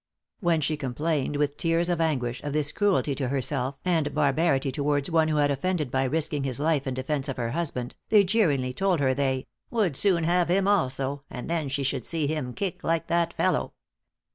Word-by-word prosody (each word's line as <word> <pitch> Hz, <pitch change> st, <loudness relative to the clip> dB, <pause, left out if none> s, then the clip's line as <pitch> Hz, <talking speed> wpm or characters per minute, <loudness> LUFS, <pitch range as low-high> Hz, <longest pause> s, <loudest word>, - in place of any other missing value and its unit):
When 170 Hz, -5 st, +2 dB
she 155 Hz, +1 st, 0 dB
complained 145 Hz, +2 st, -1 dB
with 145 Hz, 0 st, 0 dB
tears 165 Hz, +1 st, +1 dB
of 175 Hz, -2 st, 0 dB
anguish, 125 Hz, -7 st, -1 dB
of 145 Hz, -1 st, -4 dB
this 150 Hz, -1 st, 0 dB
cruelty 200 Hz, -8 st, +1 dB
to 135 Hz, -1 st, -2 dB
herself, 135 Hz, 0 st, -1 dB
and 160 Hz, -5 st, +1 dB
barbarity 140 Hz, -1 st, +2 dB
towards 145 Hz, +3 st, -1 dB
one 160 Hz, -1 st, +3 dB
who 155 Hz, -, 0 dB
had 145 Hz, -1 st, +3 dB
offended 150 Hz, -1 st, -1 dB
by 130 Hz, 0 st, +1 dB
risking 150 Hz, +1 st, -1 dB
his 135 Hz, -1 st, -2 dB
life 150 Hz, -2 st, +1 dB
in 130 Hz, -, -2 dB
defence 135 Hz, +2 st, -2 dB
of 135 Hz, -, -4 dB
her 115 Hz, -1 st, -2 dB
husband, 140 Hz, -6 st, -3 dB, 0.2 s
they 210 Hz, -2 st, +6 dB
jeeringly 160 Hz, -, +1 dB
told 185 Hz, +3 st, +1 dB
her 130 Hz, -2 st, +2 dB
they 130 Hz, -1 st, -1 dB, 0.2 s
"would 210 Hz, -, 0 dB
soon 180 Hz, 0 st, +3 dB
have 175 Hz, +1 st, +2 dB
him 190 Hz, +2 st, +2 dB
also, 140 Hz, -7 st, +1 dB
and 125 Hz, -, -7 dB
then 165 Hz, -4 st, -1 dB
she 140 Hz, +1 st, -1 dB
should 135 Hz, -2 st, -2 dB
see 160 Hz, -3 st, -1 dB
him 140 Hz, -5 st, -3 dB
kick 195 Hz, -4 st, -3 dB
like 165 Hz, 0 st, 0 dB
that 170 Hz, 0 st, +2 dB
fellow." -, -, 0 dB
150 Hz, 200 wpm, -26 LUFS, 135-170 Hz, 0.2 s, they